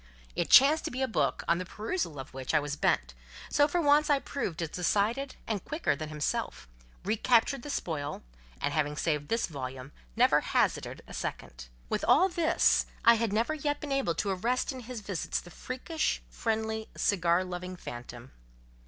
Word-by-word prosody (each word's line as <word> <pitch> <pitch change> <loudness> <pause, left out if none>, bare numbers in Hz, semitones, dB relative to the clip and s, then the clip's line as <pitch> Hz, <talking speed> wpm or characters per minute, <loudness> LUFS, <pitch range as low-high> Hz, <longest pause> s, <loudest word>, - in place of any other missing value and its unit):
It - - -1
chanced 290 +4 +7
to - - -1
be 260 +2 -2
a - - +1
book, 225 - 0
on 170 +1 +3
the - - -2
perusal 215 - -3
of 135 - -8
which 130 +3 -3
I - - +6
was 145 0 -3
bent; 60 - +1 0.4
so 290 0 +4
for 350 +4 0
once 295 -1 +4
I 290 - +5
proved 185 - -3
as 165 - -3
decided 210 - 0
and 215 -4 -2
quicker 310 - -1
than 155 +1 -6
himself; 150 - -3 0.4
recaptured 230 +5 +2
the 290 - -8
spoil, 150 - -3 0.4
and—having 150 0 0
saved 150 -3 -1
this 230 +1 +1
volume—never 130 - -1
hazarded - - 0
a - - -11
second. - - -6 0.2
With - - -2
all 375 - +6
this, 340 -2 +3 0.2
I 235 - +9
had 230 -2 0
never 230 +8 +1
yet 290 -1 -1
been 295 - -6
able 270 -12 +1
to 195 - -1
arrest 235 +10 0
in 260 - -7
his 245 -1 -7
visits 195 -4 -2
the 175 - -13
freakish, 260 - -2
friendly, 220 -1 -2
cigar 175 -2 +2
loving 180 0 -6
phantom. 120 -4 -9
205 Hz, 175 wpm, -30 LUFS, -, 0.4 s, I